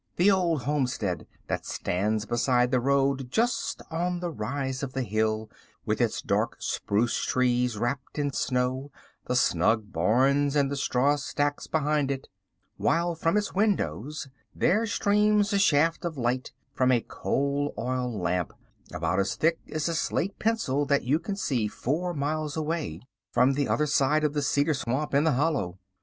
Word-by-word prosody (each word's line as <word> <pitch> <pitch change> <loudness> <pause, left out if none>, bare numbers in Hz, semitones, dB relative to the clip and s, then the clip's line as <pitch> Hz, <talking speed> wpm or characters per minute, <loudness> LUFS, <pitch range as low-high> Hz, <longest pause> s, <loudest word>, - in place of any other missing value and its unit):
The 190 +4 +5
Old 170 -7 +1
Homestead 125 -9 -1 0.2
that - - -3
stands 105 +4 -1
beside 125 +1 +2
the 130 - +3
road 135 0 +1
just 230 - 0
on 175 +2 -1
the 175 -1 -3
rise 130 +1 -3
of 135 -2 -4
the 130 - -1
hill, 110 0 0 0.4
with - - 0
its - - 0
dark - - 0
spruce 110 +4 0
trees 125 -2 +1
wrapped 130 +6 -3
in 145 -2 -1
snow, 130 +3 -1 0.4
the 125 - 0
snug 105 -1 +2
barns 135 - +2
and 140 -1 +2
the - - -1
straw 140 +1 +2
stacks 145 0 -2
behind 150 -2 +1
it; 135 -1 -4 0.5
while 170 +3 +1
from 165 +4 +1
its 205 -1 -1
windows 150 - -1 0.3
there 220 +5 +2
streams 210 0 +2
a 200 - +3
shaft 165 -2 +3
of 165 -3 -3
light 125 +1 -1 0.2
from 130 -1 +2
a 120 -2 +3
coal 140 +4 -1
oil 125 +1 -1
lamp, 90 -4 -1 0.4
about 85 +4 -1
as 100 0 0
thick 165 +1 +2
as 155 0 -1
a 170 - -1
slate 185 +4 -1
pencil 215 -11 +1
that 140 0 +1
you 140 +6 +2
can 195 +4 -4
see 130 - 0
four 165 +11 -2
miles 150 +1 -2
away, 160 0 -2 0.3
from 125 +3 +3
the 140 +1 0
other 150 - +1
side 150 +1 +2
of 150 -1 +1
the 145 - 0
cedar 145 +2 +2
swamp 140 +2 -2
in 140 +3 +3
the 160 - +3
hollow. 135 - 0
140 Hz, 165 wpm, -27 LUFS, 125-155 Hz, 0.5 s, The